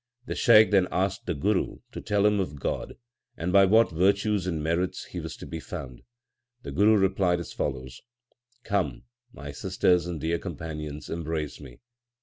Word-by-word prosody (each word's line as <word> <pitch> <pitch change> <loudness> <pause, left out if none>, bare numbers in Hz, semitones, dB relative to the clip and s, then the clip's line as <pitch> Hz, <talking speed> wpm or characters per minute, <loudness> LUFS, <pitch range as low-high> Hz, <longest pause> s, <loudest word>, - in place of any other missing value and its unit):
The - - -3
Shaikh 110 -2 +6
then 95 -3 +4
asked 95 +5 -1
the 90 - -1
Guru 100 +7 0
to - - -7
tell 105 0 +1
him 105 -1 +3
of 75 -7 -3
God, - - -3 0.4
and 90 +2 -2
by 100 -1 +7
what 110 +3 +4
virtues 100 +3 +1
and 80 -4 -2
merits 90 +3 -1
He 90 - -7
was 80 -3 -7
to - - -9
be 80 - -6
found. 65 -5 -8 0.6
The - - -6
Guru 105 +2 +4
replied 95 -2 +2
as 85 - -7
follows: 65 -2 -4 0.6
Come, 95 - -1 0.3
my 70 -6 -8
sisters 90 +4 +1
and 85 -3 -4
dear 80 +3 -1
companions, 75 -3 -6
embrace 80 -2 -4
me. 65 -4 -13
90 Hz, 170 wpm, -27 LUFS, 75-100 Hz, 0.6 s, by